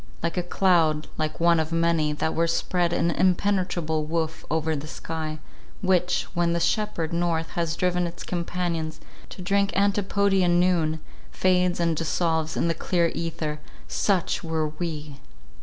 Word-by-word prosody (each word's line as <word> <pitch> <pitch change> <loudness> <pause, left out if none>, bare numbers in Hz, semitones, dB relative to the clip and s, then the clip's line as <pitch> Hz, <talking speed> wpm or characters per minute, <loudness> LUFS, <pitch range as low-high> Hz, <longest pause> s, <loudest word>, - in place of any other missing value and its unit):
Like 170 -1 -1
a 180 - +1
cloud, 170 -4 +2
like 155 0 -2
one 170 0 +4
of 160 0 -2
many 165 -2 +2
that 155 +1 -1
were 165 +1 +2
spread 170 +1 0
in 170 0 +1
impenetrable 180 -4 +1
woof 160 0 -2
over 160 0 0
the 145 +1 -5
sky, 155 -1 -5 0.5
which, 180 -1 +2
when 170 -1 +1
the 170 - +1
shepherd 175 -5 0
north 170 -1 0
has 170 -1 -1
driven 180 0 +1
its 170 0 -8
companions 170 -2 -2 0.3
"to 185 - -9
drink 200 +1 +2
Antipodean 195 -3 +2
noon," 165 -3 +2 0.3
fades 180 -1 +2
and 170 -1 +2
dissolves 160 0 0
in - - +1
the 165 - +2
clear 170 +1 +1
ether—Such 165 +3 -2
were 160 -2 -1
we! 155 -3 -5
170 Hz, 145 wpm, -25 LUFS, 160-180 Hz, 0.5 s, one